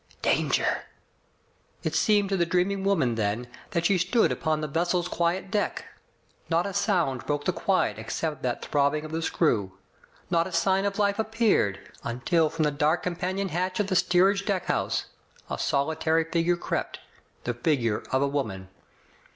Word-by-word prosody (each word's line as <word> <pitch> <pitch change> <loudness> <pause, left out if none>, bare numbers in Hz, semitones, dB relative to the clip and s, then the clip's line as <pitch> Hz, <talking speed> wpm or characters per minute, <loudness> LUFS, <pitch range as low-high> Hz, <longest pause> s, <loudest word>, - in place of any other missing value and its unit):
Danger!'* - - +1 1.0
It - - -1
seemed 205 -2 +3
to 195 - +1
the 175 - +2
dreaming 180 +3 0
woman 165 -12 +2
then 110 +2 -1 0.2
that 170 0 -1
she 185 +1 +3
stood 225 +6 +3
upon 155 -1 0
the 155 - -2
vessel's 175 +4 0
quiet 180 +2 -1
deck. 205 0 -1 0.6
Not 165 +1 +2
a 200 - -4
sound 180 - +1
broke 145 0 -1
the - - +1
quiet - - 0
except 155 -4 -3
that 125 -1 -2
throbbing 145 +1 +1
of 155 - -8
the 165 +1 -2
screw. 110 - +1 0.6
Not 170 0 +2
a - - -8
sign 190 +3 +2
of 200 0 -1
life 200 0 +1
appeared, 215 - +1
until 155 +7 +1
from 160 0 -1
the 150 - +2
dark 155 +4 +1
companion 185 +2 -2
hatch 185 +3 -2
of 205 -1 0
the 185 - +1
steerage 190 +3 +3
deckhouse 195 -3 -1 0.5
a - - -3
solitary 160 +3 +1
figure 170 +1 +1
crept - - -3 0.2
— - - -37
the 120 - -1
figure 120 -4 0
of 130 +1 +2
a - - +2
woman. 110 -10 -3
170 Hz, 165 wpm, -27 LUFS, 145-190 Hz, 1.0 s, seemed